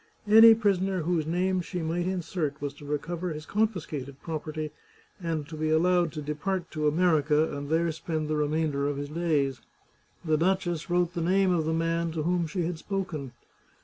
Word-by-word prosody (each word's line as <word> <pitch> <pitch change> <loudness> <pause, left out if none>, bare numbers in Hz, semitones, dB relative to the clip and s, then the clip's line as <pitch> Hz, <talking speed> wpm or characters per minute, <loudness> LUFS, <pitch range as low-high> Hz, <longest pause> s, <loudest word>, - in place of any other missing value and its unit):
Any 225 +2 +9
prisoner 195 -4 +1
whose 165 -2 0
name 180 +2 +1
she 175 0 -4
might 170 +2 -1
insert 170 -5 -2
was 145 -1 -4
to 145 - -13
recover 165 +5 -3
his 155 -1 -6
confiscated 160 - -2
property, 155 -1 -4 0.5
and 160 -4 -2
to 160 - -8
be 155 0 -1
allowed 175 +1 +3
to 155 -2 -5
depart 165 +4 -3
to 155 -1 0
America 155 -2 +2
and 140 0 -5
there 165 +1 +2
spend 160 -1 -3
the 155 - 0
remainder 150 -1 0
of 145 -1 -2
his 145 0 -4
days. 150 -6 0 0.6
The 155 -1 +2
duchess 175 0 0
wrote 175 0 +1
the 170 - -2
name 190 +2 +3
of 165 -3 +1
the 160 - 0
man 165 0 0
to 160 -2 -2
whom 175 0 +1
she 175 +2 -2
had 165 -1 -3
spoken. 170 -10 -4
165 Hz, 180 wpm, -28 LUFS, 150-180 Hz, 0.6 s, Any